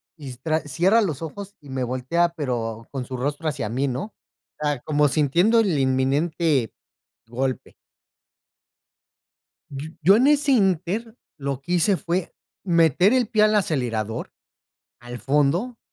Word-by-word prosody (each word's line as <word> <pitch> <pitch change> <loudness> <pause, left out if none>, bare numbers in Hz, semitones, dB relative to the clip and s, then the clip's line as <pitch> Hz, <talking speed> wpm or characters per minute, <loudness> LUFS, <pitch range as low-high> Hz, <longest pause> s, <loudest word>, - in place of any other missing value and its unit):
y 145 -5 -9
s 125 0 -9
tra 155 +2 0
cierra 175 - +2
los 160 -9 -2
ojos 200 +5 -8
y 145 - -15
me 130 -1 -2
voltea, 130 +8 0
pero 115 -6 -3
con 135 -3 -4
su 130 0 -6
rostro 145 +5 -3
hacia 125 -7 -3
mí, 130 +5 -1
¿no?, 135 - -4 0.5
o - - -6
sea, 145 -3 -1
como 150 -1 +2
sintiendo 170 - +3
el 185 -10 +1
inminente 135 +1 +1 0.6
golpe. 130 +2 -3 2.0
Y 150 +4 -8
yo 195 +6 +6
en 255 +5 +4
ese 290 -1 +3
inter, 200 +1 0 0.2
lo 140 -2 -3
que 175 +6 -6
hice 185 +3 +3
fue 175 +1 -3 0.3
meter 170 - +3
el 250 -4 +2
pie 215 -1 +3
al 215 0 +3
acelerador, 120 - -1 0.7
al 120 0 -8
fondo, 150 - +1
150 Hz, 145 wpm, -23 LUFS, 130-185 Hz, 2.0 s, yo